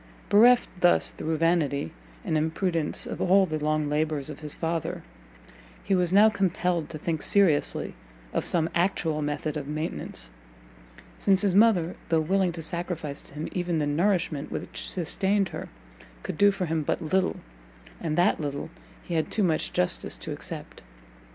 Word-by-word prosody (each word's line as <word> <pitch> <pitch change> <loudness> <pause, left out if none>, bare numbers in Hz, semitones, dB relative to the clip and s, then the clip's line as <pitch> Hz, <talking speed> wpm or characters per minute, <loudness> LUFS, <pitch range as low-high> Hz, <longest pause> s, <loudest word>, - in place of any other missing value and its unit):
Bereft 240 +4 +6
thus 175 -1 +4
through 160 0 -3
vanity 155 - +1 0.3
and - - 0
imprudence 160 +1 0
of - - -5
all 195 +2 +5
the 155 -3 -3
long 155 0 +1
labours 150 -1 -1
of - - -9
his 150 -2 -6
father, 165 -1 -3 0.8
he - - 0
was 180 -2 +2
now 205 +3 +7
compelled 180 -5 0
to - - -6
think 160 0 -2
seriously 185 -8 +2 0.4
of - - 0
some 165 -2 +1
actual 170 -3 0
method 150 +1 -2
of 140 -2 -5
maintenance; 150 - -3 0.9
since 195 0 +3
his 195 -3 +2
mother, 195 -5 +4
though 165 -1 +3
willing 185 +3 +1
to 165 -1 -6
sacrifice 165 -4 -4
to - - -13
him 150 +2 -4
even 175 -2 -1
the 150 - +1
nourishment 160 -1 0
which - - -5
sustained 195 +3 0
her, - - -7 0.5
could - - -4
do 205 0 +7
for 195 -2 -1
him 160 -1 -1
but 145 - -1
little, 185 +4 +1 0.6
and 155 - -2
that 175 - +3
little 145 +2 -4 0.3
he 175 - -6
had 160 -1 0
too 215 - 0
much 165 -4 +1
justice 90 - -1
to - - -7
accept. - - -7
165 Hz, 165 wpm, -27 LUFS, 155-185 Hz, 0.9 s, now